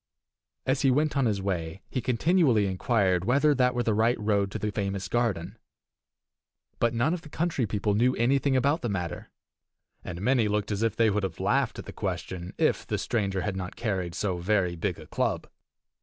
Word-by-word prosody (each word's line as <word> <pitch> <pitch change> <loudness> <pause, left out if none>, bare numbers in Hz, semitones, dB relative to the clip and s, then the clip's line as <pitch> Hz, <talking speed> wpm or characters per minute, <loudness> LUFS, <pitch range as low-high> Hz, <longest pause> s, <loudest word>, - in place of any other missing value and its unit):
As 130 +1 +1
he 135 - +4
went 150 +4 +2
on 135 -3 +2
his 100 -3 -1
way 90 -2 -3
he 130 - -3
continually 125 - +3
inquired 95 -1 +1
whether 140 +7 +3
that 125 -2 +2
were 120 - +1
the 110 - +1
right 115 +3 +2
road 100 -2 +1
to - - -4
the 105 - -2
famous 100 -2 -2
garden. 110 -4 -1 1.2
But 120 0 +1
none 125 +8 +2
of 180 - -3
the 150 - -13
country 155 -6 -1
people 105 +1 0
knew 125 +5 +3
anything 135 +3 +2
about 140 +5 +2
the 120 - -2
matter, 90 -5 -4 0.7
and 85 -1 -6
many 120 +1 +2
looked 105 0 -1
as 105 0 -1
if 115 -2 +1
they 115 -2 +3
would 105 +1 0
have 95 -4 -4
laughed - - +1
at - - -7
the - - -8
question 90 -1 -4
if - - +1
the - - -1
stranger 100 -4 -1
had 100 +1 -2
not 95 -1 -5
carried 95 -6 -2
so 95 -1 -1
very 90 -1 +1
big 80 - -2
a - - -11
club. - - -1
105 Hz, 200 wpm, -27 LUFS, 95-125 Hz, 1.2 s, he